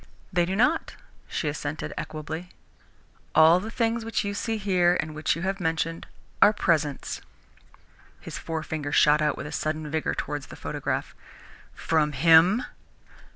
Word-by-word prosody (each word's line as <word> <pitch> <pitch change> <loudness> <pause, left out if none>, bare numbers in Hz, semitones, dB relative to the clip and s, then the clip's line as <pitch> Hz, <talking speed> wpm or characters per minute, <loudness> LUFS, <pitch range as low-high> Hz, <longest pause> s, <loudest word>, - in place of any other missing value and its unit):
"They 175 -1 +2
do 190 - -1
not," 250 +10 +1 0.3
she 155 - -3
assented 145 +1 -4
equably. 160 +3 -6 0.9
"All 160 +3 +7
the 215 +4 -6
things 230 0 0
which 225 -2 -1
you 200 - -2
see 225 +2 -2
here 180 -4 +2
and 155 0 -3
which 155 +1 0
you 165 - -5
have 195 +1 -1
mentioned, 165 -1 -2 0.3
are 205 - +8
presents." 155 -8 0 1.0
His - - -7
forefinger 155 -2 -4
shot 150 +1 +5
out 150 -1 +1
with - - -6
a 150 - -6
sudden 155 -1 -3
vigour 160 0 -1
towards 145 -1 -4
the - - -10
photograph. - - -3 0.6
"From 150 -2 +1
him?" 165 - +5
165 Hz, 150 wpm, -26 LUFS, 155-195 Hz, 1.0 s, are